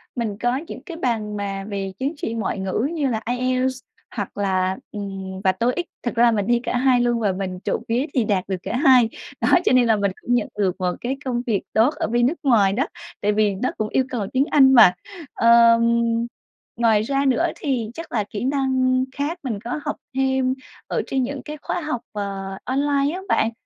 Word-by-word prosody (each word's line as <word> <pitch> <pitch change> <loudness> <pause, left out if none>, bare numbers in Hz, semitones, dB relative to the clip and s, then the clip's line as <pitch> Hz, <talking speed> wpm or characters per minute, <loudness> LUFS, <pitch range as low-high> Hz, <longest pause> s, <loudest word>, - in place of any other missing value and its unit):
mình 220 -5 -2
có 245 +2 0
những - - -8
cái 335 -4 -7
bằng 220 -8 -2
mà 195 -1 -4
về 195 -2 -3
chứng 275 +4 -1
chỉ 230 - -3
ngoại 225 -2 -2
ngữ 190 +7 -1
như 300 -4 0
là 220 -3 -1 0.2
IELTS 255 0 0 0.4
hoặc 205 -4 -5
là, 190 -1 0
ừm, 195 -2 -6
và 190 - +4
TOEIC. 245 - -1 0.2
Thật 240 - -2
ra 235 - +4
là 235 - +6
mình 205 -3 0
thi 240 0 +3
cả 250 - -1
hai 255 -1 +3
luôn 240 -1 +1
và 205 -4 +1
mình 185 -1 -4
trộm - - -2
vía 240 +4 +1
thì 250 - +2
đạt 195 -3 +1
được 190 -1 -2
cả 240 - -2
hai. 255 -5 +5 0.3
Đó, - - +2 0.2
cho - - +4
nên 250 -2 +5
là 225 - +4
mình 200 -2 0
cũng 245 - -1
nhận 240 - 0
được 190 -3 +1
một 180 -1 0
cái 260 +3 -2
công 245 -2 -1
việc 210 -4 +1
tốt 235 +8 +4
ở - - -2
bên 240 +2 +2
nước 320 +6 -2
ngoài 210 -8 +4
đó, 250 +6 +1 0.4
tại 205 +1 +2
vì 210 -1 +2
nó 250 +7 -1
cũng 215 -1 -2
yêu 265 - +2
cầu 225 -6 -3
tiếng 265 +2 +3
Anh 265 -2 +6
mà. 220 -8 +8 0.4
Ờm, 230 0 +6 1.0
ngoài 225 -3 +3
ra 275 +5 0
nữa 260 -3 +2
thì 260 - -2
chắc 330 +3 -8
là 215 -3 0
kỹ 210 +2 -4
năng 260 -2 +1
khác 300 +5 -2
mình 225 -6 -3
có 240 +5 -3
học 295 - -1 0.2
thêm 265 -1 +1 0.3
ở - - -1
trên 265 -1 0
những 270 +1 -4
cái 300 0 -6
khóa 350 - -3
học, 300 -6 -3
ờ, 195 -2 -5
online 280 +2 +1
á 375 - -5
bạn. 225 - +2
235 Hz, 220 wpm, -22 LUFS, 205-265 Hz, 1.0 s, mà